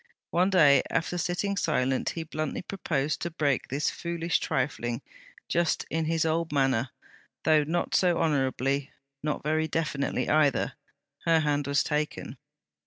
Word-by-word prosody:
One 180 +3 +3
day, 145 -8 +6
after 175 +2 -1
sitting 180 +4 -1
silent, 135 -8 0
he 165 - -2
bluntly 155 +1 -4
proposed 155 -7 -2
to 170 - -2
break 145 -5 0
'this 140 +3 0
foolish 170 0 -1
trifling'; 130 -4 -2 0.4
just 170 -1 +1
in 160 0 0
his 165 0 +1
old 160 0 0
manner, 135 -3 +1 0.5
though 155 -1 +4
not 170 +4 -1
so 175 -2 +3
honourably; 140 -3 0 0.3
not 150 0 -2
very 155 +1 +1
definitely 150 -3 -1
either. 150 -3 +2 0.5
Her 165 -1 +4
hand 145 -2 0
was 140 0 +2
taken. 150 0 -3
155 Hz, 140 wpm, -28 LUFS, 140-165 Hz, 0.5 s, day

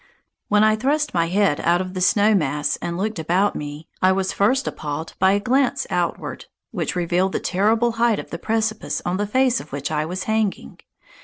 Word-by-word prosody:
When 210 0 +4
I 215 0 +4
thrust 290 +6 0
my 170 -1 +1
head 190 -4 +2
out 175 +1 +2
of 185 0 -4
the 185 - -4
snow 205 +3 +4
mass 150 -5 0
and 170 0 -4
looked 210 0 -2
about 180 +6 +1
me, 150 +1 -7
I 185 - +5
was 190 0 0
first 260 +7 +2
appalled 150 +2 -5
by 190 +1 +4
a 200 - +2
glance 260 +5 +1
outward, - - -2 0.3
which - - -3
revealed 180 +2 0
the - - 0
terrible 220 +5 +1
height 230 -1 +2
of - - -8
the 170 - -5
precipice 220 -1 -2
on 175 +1 -1
the 205 +1 -1
face 255 +2 +2
of 150 - -11
which 140 +2 -4
I 155 0 0
was 180 +3 -4
hanging. 215 - -2
190 Hz, 205 wpm, -22 LUFS, 170-220 Hz, 0.3 s, I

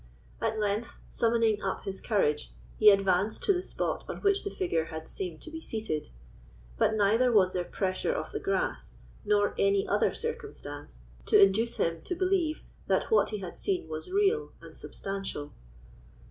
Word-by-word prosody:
At 220 - 0
length, 210 +2 -1
summoning 225 -2 +2
up 190 - -3
his 195 -1 -5
courage, 150 -9 0 0.3
he 215 - +9
advanced 195 +1 +2
to 400 - +4
the 360 - -1
spot - - -3
on - - -4
which 400 0 +2
the 405 - -2
figure 345 - -1
had 160 -1 -7
seemed 175 -5 -5
to 320 - -9
be 320 0 -7
seated; 215 - -3 0.7
but 220 - +2
neither 220 +4 +3
was 190 -5 +4
there 180 - 0
pressure 185 - -1
of - - -3
the - - -3
grass 390 -1 -2 0.3
nor 205 -1 +2
any 200 0 +3
other - - +2
circumstance 430 - -6 0.3
to - - +6
induce 200 +4 +4
him 165 -1 0
to 360 - -4
believe 360 -4 0 0.2
that - - +1
what 445 - +4
he 215 - -3
had 180 -2 -7
seen 185 -4 -1
was 155 0 -6
real 410 +3 +1
and - - -13
substantial. 195 -7 -5
210 Hz, 170 wpm, -29 LUFS, -, 0.7 s, he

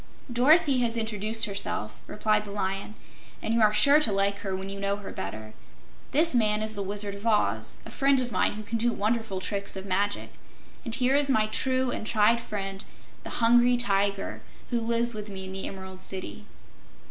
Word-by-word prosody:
"Dorothy 280 +2 +4
has 235 -1 0
introduced 220 0 0
herself," 110 - -4
replied 210 0 0
the 210 - -10
Lion, 195 +1 -3 0.4
"and 220 - -2
you 230 - +2
are 215 -1 +5
sure 280 +8 +6
to 270 -8 +4
like 200 0 +1
her 195 -2 -3
when 190 +1 -6
you 195 0 -6
know 200 0 0
her 205 -1 -8
better. 110 +2 -7 0.6
This 325 +4 +4
man 215 -3 +2
is 215 0 +1
the 205 - -3
Wizard 200 +1 -2
of 200 +3 -6
Oz, 110 - +1
a - - -9
friend 275 -1 +2
of 245 -1 -2
mine 185 - +1
who 215 +1 -7
can 225 +2 -3
do 240 +1 +2
wonderful 215 -2 -1
tricks 200 +1 -2
of 190 0 -6
magic. 200 +2 -1 0.5
And 230 -3 0
here 260 +1 +2
is 285 -1 +2
my 220 -5 +3
true 255 +3 +1
and 220 - -4
tried 225 +2 +3
friend, 195 -3 -5 0.4
the - - -7 0.2
Hungry 240 +1 +5
Tiger, 200 -3 0 0.3
who 240 -1 0
lives 235 +1 +1
with 210 -1 -6
me 190 -1 -7
in 190 - -7
the 190 0 -4
Emerald 190 -1 -9
City." 185 - -6
210 Hz, 195 wpm, -27 LUFS, 195-235 Hz, 0.6 s, sure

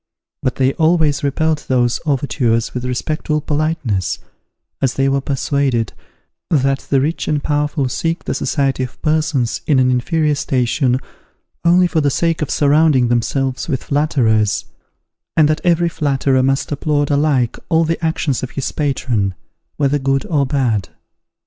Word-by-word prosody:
But 130 - -1
they 130 0 +2
always 160 -3 +2
repelled 150 +2 0
these 120 -2 +2
overtures 125 -5 0
with 125 0 -4
respectful 150 +4 -1
politeness, 145 - -1 0.6
as 130 -2 +1
they 135 0 +2
were 135 0 +1
persuaded 135 -4 -1 0.6
that 135 -3 +2
the 135 - +3
rich 155 +5 -1
and 150 -2 0
powerful 145 -1 0
seek 165 +6 -2
the - - -2
society 135 -3 0
of 130 -1 -5
persons 155 -6 0
in 145 - +3
an 130 0 +3
inferior 150 +5 +1
station 130 -1 0 0.6
only 175 +2 +5
for 165 -2 +1
the 145 - +2
sake 165 +3 0
of 150 - -2
surrounding 145 -4 +3
themselves 130 +2 -1
with 130 - -1
flatterers, 120 -8 +1 0.7
and 155 -2 +6
that 155 +1 0
every 175 -1 +3
flatterer 135 -4 +1
must 135 +3 0
applaud 145 0 0
alike 140 -5 +1
all 165 -1 +3
the 165 +1 -2
actions 160 -4 0
of 130 - -4
his 140 - -3
patron, 120 -9 -1 0.4
whether 145 0 +1
good 135 0 0
or 145 -5 +1
bad. 120 -9 0
140 Hz, 150 wpm, -18 LUFS, 130-155 Hz, 0.7 s, and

